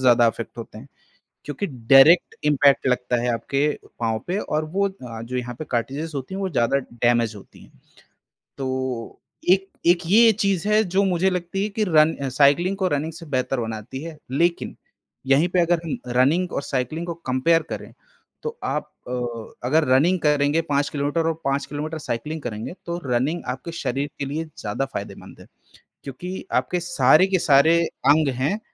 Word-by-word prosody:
ज़्यादा 120 -2 +5
इफ़ेक्ट 115 +1 -6
होते 110 -2 -8
हैं 130 +5 -13 0.6
क्योंकि 145 +7 -3
डायरेक्ट 135 +6 +5
इम्पैक्ट 145 -2 +4
लगता 125 -1 +1
है 125 - 0
आपके 135 +6 0 0.3
पाँव 110 -2 0
पे, 180 +3 -1
और 155 -5 -2
वो 195 +6 0
अ, 125 -12 -9
जो 125 +2 -4
यहाँ 125 -1 -4
पे 155 - -5
कार्ट्रिज़ेस 135 +7 -2
होती 135 +7 -5
हैं 195 - -4
वो 190 - -1
ज़्यादा 135 -3 +1
डेेमेज़ 120 -1 +1
होती 100 - -16
हैं, - - -19 0.9
तो 130 -3 -4 0.3
एक 195 +1 +3 0.2
एक 175 0 +5
ये 225 +5 +6
चीज़ 195 -2 +1
है 215 +1 +4
जो 190 0 +1
मुझे 185 0 +2
लगती 180 +1 -2
है 210 - -1
कि 215 +1 -1
रन 160 -1 +4
अ, 140 -1 -4
साइक्लिंग 145 +8 +3
को 190 -1 +1
रनिंग 150 0 -1
से 165 +1 -10
बेहतर 130 0 0
बनाती 110 +3 -5
है। 165 -2 -8
लेकिन 170 +5 0 0.5
यहीं 140 +5 +4
पे 180 - +1
अगर 170 0 +2
हम 160 - -3 0.2
रनिंग 165 +8 +3
और - - -1
साइक्लिंग 140 +6 -3
को 170 - -2 0.2
कंपेयर 145 +6 +3
करें, - - -7 0.5
तो 465 0 -5
आप - - -2 0.2
अ, - - -6 0.6
अगर 155 +5 +3
रनिंग 160 +8 +4
करेंगे 150 +1 +2
5 145 0 +1
किलोमीटर 145 +3 -1
और 165 - +1
5 140 0 0
किलोमीटर 150 +2 -5
साइक्लिंग 150 +4 -4
करेंगे 115 +2 -5
तो 170 0 -3
रनिंग 130 +7 0
आपके 130 +6 -8
शरीर 140 +3 -2
के 140 - -2
लिए 150 +4 -3
ज़्यादा 105 +6 -2
फायदेमंद - - -8
है - - -14 0.6
क्योंकि 175 +8 -7 0.2
आपके 180 - -3
सारे 155 +1 +4
के 190 -1 +1
सारे 155 +2 +5 0.3
अंग 155 +1 +5
हैं, 150 +11 0
145 Hz, 180 wpm, -23 LUFS, 130-170 Hz, 0.9 s, ये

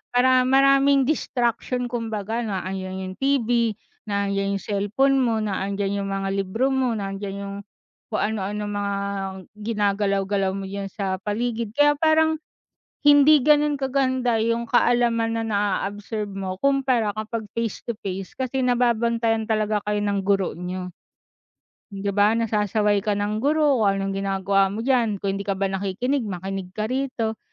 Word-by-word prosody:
para 255 0 +4
maraming 275 +1 +5
distraction. 245 -3 -1
Kumbaga 225 -2 -3
na 200 -6 -3
andyan 190 0 -4
yung 185 0 -6
TV, 240 -5 +1 0.3
nandiyan 200 -1 -1
yung - - -14
cellphone 210 +7 +1
mo, 235 -4 +2
na 205 -3 -2
andiyan 200 0 -2
yung 195 - -4
mga 195 0 -2
libro 200 +6 0
mo, 265 -2 +1
nandiyan 195 -2 -4
yung 200 0 -6 0.6
kung 215 - 0
anu-ano 210 0 -2
mga 205 -1 -2 0.7
ginagalaw-galaw 200 -2 0
mo 195 0 -5
diyan 195 0 -5
sa 195 -2 -2
paligid. 225 +1 -2
Kaya 290 +4 +4
parang 315 +1 +3 0.7
hindi 290 0 +7
ganun 295 0 +3
kaganda 260 -3 +1
yung 230 +1 0
kaalaman 240 -2 +2
na - - -1
na 205 -2 +1 0.3
absorb 205 +1 -5
mo 190 -1 -4
kumpara 260 -6 +1
kapag 220 0 -4
face-to-face 205 -4 -4
kasi 260 0 -2
nababantayan 235 -2 +1
talaga 215 -1 +1
kayo 210 0 +1
ng 200 -1 0
guro 195 -1 +1
niyo. 180 +2 -6 1.0
'Di 200 +1 -2
ba, 205 +2 +3
nasasaway 210 -2 +1
ka 205 +1 0
ng 205 +1 -1
guro 290 +1 +2
kung 195 - +3
anong 195 0 -2
ginagawa 195 0 +1
mo 225 - -3
diyan. 230 -6 +1
Kung 195 0 -1
hindi 200 - -6
ka 195 - 0
ba 195 0 -1
nakikinig 200 +7 -1
makinig 190 0 -4
ka 215 +2 -3
rito. 250 -4 -2
215 Hz, 150 wpm, -23 LUFS, 195-245 Hz, 1.0 s, hindi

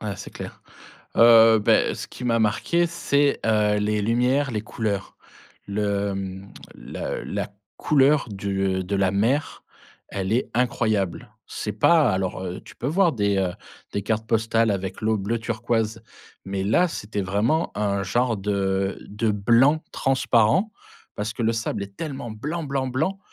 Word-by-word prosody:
Ah, 105 -2 -4
c'est - - -9
clair. - - -9 0.5
Heu, 115 -1 +7
beh, 105 - +3
ce - - -6
qui - - -10
m'a 115 -1 +2
marqué, 140 +11 +1
c'est, 145 -4 +1
heu, 105 -1 +2
les 105 0 0
lumières, 125 +5 +1
les 105 -2 -2
couleurs, 105 -3 -3 0.5
le 100 0 -1
mmh, 95 0 -6 0.2
la - - -5
la - - -3 0.3
couleur 145 -1 +3
du, 100 -1 -3 0.2
heu, - - -2
de 100 +3 -2
la 95 -1 +2
mer. 115 +9 0 0.5
Elle 95 +1 -2
est 125 - 0
incroyable, 110 -6 0 0.2
c'est 105 - -4
pas 145 +5 +4
alors 95 -1 -2
heu, 90 -1 -5
tu - - -13
peux 120 - -6
voir 170 +2 +3
des, 100 -3 +1
heu, 95 -2 0 0.4
des 100 - -1
cartes 110 +2 -1
postales 115 0 +2
avec 95 -1 -3
l'eau 110 0 +1
bleu 105 +4 -2
turquoise 115 -1 -2 0.4
mais 95 0 -3
là, 170 - +3
c'était 105 -7 -4
vraiment 105 - 0
un 100 -1 0
genre 120 +5 +1
de 95 -1 -1
de 105 +2 -1
blanc 120 +9 +3
transparent 135 - +2 0.5
parce 105 +2 -3
que 115 +1 -4
le 115 +1 +2
sable 115 -3 -2
est 100 0 -11
tellement 135 -5 -5
blanc, 150 +10 -4
blanc, 135 -2 -2
blanc 160 +10 -1
110 Hz, 160 wpm, -24 LUFS, 100-125 Hz, 0.5 s, Heu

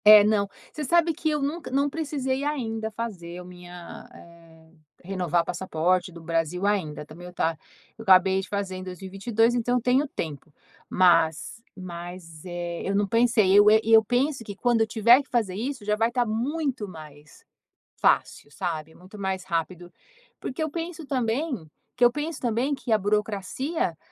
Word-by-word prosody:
É, 210 -1 +10
não, 205 -1 +2 0.2
você 305 - -4
sabe 335 +3 +3
que 315 0 -1
eu 300 -2 0
nunca 305 +4 -3
não 275 +2 +1
precisei 280 -3 -2
ainda 225 -7 -2
fazer 200 -6 -6
a 180 - -8
minha 180 -1 -11
eh, 165 -1 -17 0.3
renovar 175 -2 0
passaporte 180 +1 0
do 170 - -11
Brasil 165 +3 -1
ainda, 175 -8 -1
também 170 +4 -11
o 180 - -11
tá 165 -2 0 0.4
eu - - -7
acabei 190 -2 +5
de 190 - -10
fazer 200 -2 -3
em 185 - -7
2022, 195 +5 0
então 245 0 0
eu - - -1
tenho 255 +5 +2
tempo, 155 - -6 0.4
mas 175 +2 +3 0.2
mas, 175 -2 -9
eh, 175 -1 -5
eu 195 - -1
não 205 0 +2
pensei, 230 -3 +3
eu 205 +1 +8
eh, 220 +1 +6
e 225 - +2
eu 220 0 +8
penso 255 +2 0
que 205 -2 -8
quando 240 +1 +2
eu 220 - +3
tiver 235 +4 +5
que 275 - -18
fazer 220 -6 0
isso 250 +1 -4
já 210 0 +2
vai 225 +2 +2
estar 240 0 0
muito 255 +1 -2
mais 155 -4 -13 0.5
fácil, - - +1
sabe, 160 +1 -4
muito 185 +4 -13
mais 190 -1 -2
rápido, 175 0 -3 0.5
porque 270 +5 -4
eu 315 - -1
penso 330 -1 -5
também 255 - -2 0.3
que 245 - +5
eu 240 - +6
penso 300 +4 -4
também 245 +4 0
que 260 -3 -6
a 220 - +6
burocracia, 210 - -1
205 Hz, 175 wpm, -26 LUFS, 175-245 Hz, 0.5 s, É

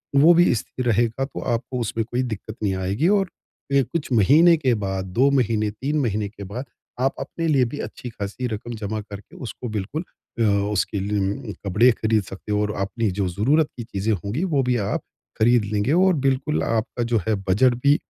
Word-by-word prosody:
वो 155 +5 +7
भी 175 -3 +5
स्थिर 125 +3 -5
रहेगा 115 +3 +1
तो 135 - -8
आपको 120 +2 -2
उसमें 115 0 -1
कोई 120 +2 -1
दिक्कत 110 -2 -5
नहीं 100 -2 +1
आएगी 95 - 0
और 195 - +1 0.5
अ, 140 - +5
कुछ 150 +2 -4
महीने 150 - +6
के 130 -5 +2
बाद, 95 -2 -3
2 120 +9 +2
महीने, 110 -3 +1
3 140 +8 -2
महीने 105 -5 -1
के 100 -1 -10
बाद 110 +8 -6 0.4
आप 135 +1 +2
अपने 165 -1 -3
लिए 135 -5 +3
भी 145 - -6
अच्छी-ख़ासी 115 0 -5
रक़म 115 +2 -5
जमा 105 +1 -3
करके 100 -1 -11
उसको 125 0 -6
बिल्कुल 135 - -3 0.4
अ, - - +1 0.3
उसके 100 +1 0
लिए 100 +3 -2
कपडे 115 +7 +5
ख़रीद 110 -2 +1
सकते 95 +3 -8
हो 105 0 +2
और 105 0 -1
आप - - -3
अपनी 115 -1 -1
जो 95 - +1
ज़रूरत 135 - +2
की 120 - -4
चीज़ें 110 -1 -1
होंगी 100 - -3
वो 140 - +4
भी 125 - +3
आप - - -1 0.4
ख़रीद 120 +1 +4
लेंगे 105 +6 +1
और 185 +2 +4
बिल्कुल 135 +3 +1
आपका 115 +2 -1
जो 115 - +4
है 110 - +2
बजट 120 +6 +4
भी 145 +1 +6
115 Hz, 200 wpm, -23 LUFS, 105-135 Hz, 0.5 s, वो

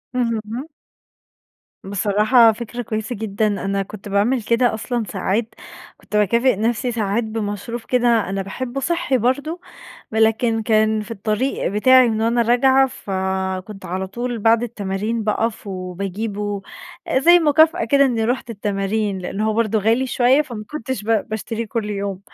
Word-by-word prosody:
اهم. 230 +2 -2 1.2
بصراحة 210 +4 +4
فكرة 235 +2 -6
كويّسة 220 +1 -4
جدًا، 215 0 -1
أنا 200 -1 -1
كنت 205 +1 -10
باعمل 215 +5 +1
كده 235 +2 +2
أصلًا 235 +2 -2
ساعات، 210 +3 -2 0.4
كنت - - -8
باكافئ 235 +5 +3
نفسي 235 +4 -1
ساعات 220 0 -1
بمشروب 220 +1 -4
كده 235 -3 +1
أنا 195 0 -2
باحبه 240 +7 -5
صحّي 335 -3 0
برضه، 285 +8 -1 0.5
ولكن 225 +1 +2
كان 220 0 +2
في 210 - -9
الطريق 220 +4 -1
بتاعي 255 +5 +5
من 220 -1 -1
وأنا 235 +1 +2
راجعة، 260 +3 +4
فكنت 190 -3 -4
على 190 +2 -3
طول 240 +4 -4
بعد 225 +2 +3
التمارين 215 0 -3
باقف 225 +1 -1
وباجيبه، 195 +2 -4 0.6
زي 345 +6 +6
مكافأة 320 +2 +4
كده 280 -1 +4
إني 235 -4 +1
رُحت 245 +1 -2
التمارين، 205 -1 -2
لأن 185 +2 -5
هو 215 0 +1
برضه 220 -1 +1
غالي 225 +5 +2
شوية 255 +3 +3
فما 235 -7 -8
كنتش 260 -6 -4
ب - - -10 0.2
باشتريه 225 +1 -4
كل 215 -1 -3
يوم، 200 -2 -3
220 Hz, 140 wpm, -20 LUFS, 205-245 Hz, 1.2 s, زي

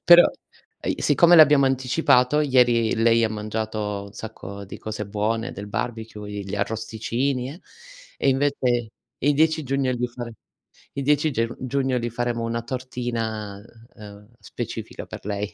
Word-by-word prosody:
però 175 0 +9 0.6
e - - -2
i - - -9
siccome 175 0 +6
l'abbiamo 150 -3 +7
anticipato, 130 +1 +3
ieri 120 -5 +3
lei 115 0 +4
ha 110 - +2
mangiato 105 -1 -3
un 100 - -13
sacco 100 -2 -8
di 95 - -9
cose 105 -1 -5
buone 110 +4 -1
del 100 +1 -7
barbecue, 110 -1 -5
gli 100 -1 -5
arrosticini 115 +5 -2
e 170 - -11 0.6
e 140 - +1
invece 130 -4 +1 0.3
il 145 0 +2
10 160 +2 +3
giugno, 135 -1 0
gli 125 0 -1
fare 120 -1 -7 0.6
il 140 - -3
10 150 +2 +3
geu 115 -1 -1
giugno 130 0 0
gli 120 0 -2
faremo 120 0 -2
una 115 0 -2
tortina, 115 -5 -4 0.3
uhm, 105 -1 -12
specifica - - -6
per - - -10
lei, 105 0 -3
115 Hz, 150 wpm, -24 LUFS, 110-130 Hz, 0.6 s, però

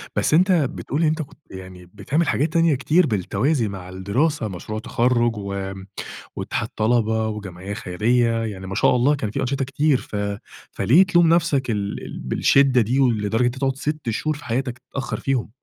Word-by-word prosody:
بس - - +1
أنت 185 +4 +5
بتقول 150 -2 0
إن 160 - +4
أنت 155 +1 0
كنت 145 0 -10
يعني، 95 -1 -10
بتعمل 145 +11 -1
حاجات 150 +5 0
تانية 165 -3 +3
كتير 155 +6 +2
بالتوازي 120 - 0
مع 95 -2 -7
الدراسة، 110 - -1
مشروع 105 +3 -6
تخرُّج 120 0 +1
و 100 -1 -4 0.6
واتحاد - - -3
طلبة 110 0 +1
وجمعية 100 -2 -6
خيرية، 115 +4 +1
يعني 95 -3 -6
ما 95 - -5
شاء - - +3
الله 130 +5 +3
كان 110 -7 -3
في - - -3
أنشطة 135 +1 -1
كتير، 145 +1 +2
ف 110 - -9 0.6
فليه 160 +11 +5
تلوم 175 -3 +4
نفْسك 150 -7 +1
ال 100 -2 -3
ال - - -7
بالشِدّة 130 - +3
دي، 120 +5 0
ولدرجة 115 -4 +1
إن - - +4
أنت 125 +1 -1
تقعد 135 0 0
6 150 -2 -3
شهور 155 +7 -1
في 145 - -13
حياتك 125 +1 -2
تتأخّر 130 +2 -5
فيهم؟ 135 -5 -1
120 Hz, 180 wpm, -22 LUFS, 105-145 Hz, 0.6 s, أنت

